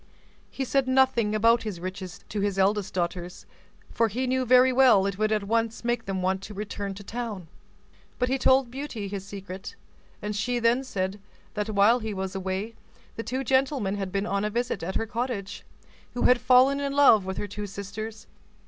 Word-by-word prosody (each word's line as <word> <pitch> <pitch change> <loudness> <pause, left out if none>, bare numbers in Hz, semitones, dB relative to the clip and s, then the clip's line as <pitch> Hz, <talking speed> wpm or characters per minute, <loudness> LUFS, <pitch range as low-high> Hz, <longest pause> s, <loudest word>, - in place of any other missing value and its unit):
He 270 - -4
said 270 0 +1
nothing 260 -5 +3
about 230 +2 +4
his 210 -6 -5
riches 185 0 -7
to 210 - -3
his 200 -1 -1
eldest 200 +1 +1
daughters, 175 0 -4 0.5
for 230 - +2
he 245 +5 -2
knew 255 0 0
very 255 +1 +6
well 245 -7 +5
it 195 -1 -3
would 215 0 +1
at 215 -1 +1
once 230 +2 -1
make 240 -1 0
them 190 -1 -3
want 190 +1 0
to 205 +1 -9
return 200 -1 -5
to 200 - -10
town; 215 -5 -5 0.7
but 250 - +1
he 265 +1 0
told 260 -1 +3
Beauty 255 -6 -5
his 195 -1 -5
secret, 195 -2 -8 0.4
and 210 0 -4
she 245 +4 -1
then 240 +2 +2
said, 195 -5 -3 0.3
that 210 0 -3
while 215 +4 +4
he 220 -3 -4
was 190 0 -4
away, 190 +3 -3 0.5
two 260 +3 -3
gentlemen 260 -5 +1
had 195 -2 -4
been 195 +1 -1
on 200 -1 -1
a 210 - 0
visit 235 -3 -2
at 185 +3 -4
her - - 0
cottage, 230 -4 -4 0.5
who 245 - -1
had 250 0 +4
fallen 260 +2 +5
in 280 -1 -2
love 275 -8 +6
with 190 0 -5
her 205 - -3
two 205 +1 -6
sisters. 210 +3 -7
215 Hz, 195 wpm, -26 LUFS, 195-245 Hz, 0.7 s, very